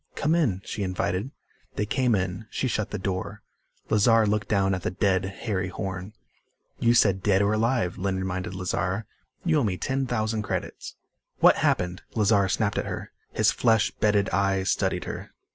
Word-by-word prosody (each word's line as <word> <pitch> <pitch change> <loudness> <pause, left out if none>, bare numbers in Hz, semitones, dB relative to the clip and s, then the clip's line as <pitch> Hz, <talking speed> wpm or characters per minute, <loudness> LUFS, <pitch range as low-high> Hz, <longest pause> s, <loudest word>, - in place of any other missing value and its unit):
"Come 155 +2 +1
in," 115 - +1
she 105 - -5
invited. 95 +3 -1 0.5
They 105 - 0
came 120 +2 +1
in. 95 +2 -3
She 130 - -1
shut 110 -4 -1
the 105 - -3
door. 95 -1 -4 0.5
Lazar 110 +1 +5
looked 105 -1 0
down 95 -2 +2
at 95 - -2
the - - -1
dead 95 0 +1
Harry 95 -1 -3
Horn. 95 +2 -5 0.7
"You 120 0 +3
said 95 -5 +4
dead 100 0 +3
or 100 +1 +2
alive," 115 -4 0
Lynn 95 0 -1
reminded 95 0 -3
Lazar. 90 +3 -2 0.4
"You 160 -3 +3
owe - - +1
me 95 -5 0
ten 135 +4 -1
thousand 110 -2 -1
credits." - - -5 0.4
"What - - +6
happened?" 90 0 0
Lazar 105 -3 +3
snapped 100 +1 0
at - - -3
her. - - -5 0.2
His - - +3
flesh 110 -3 +2
bedded 105 -2 +2
eyes 95 -1 +1
studied - - 0
her. - - -7
100 Hz, 175 wpm, -26 LUFS, 95-110 Hz, 0.7 s, What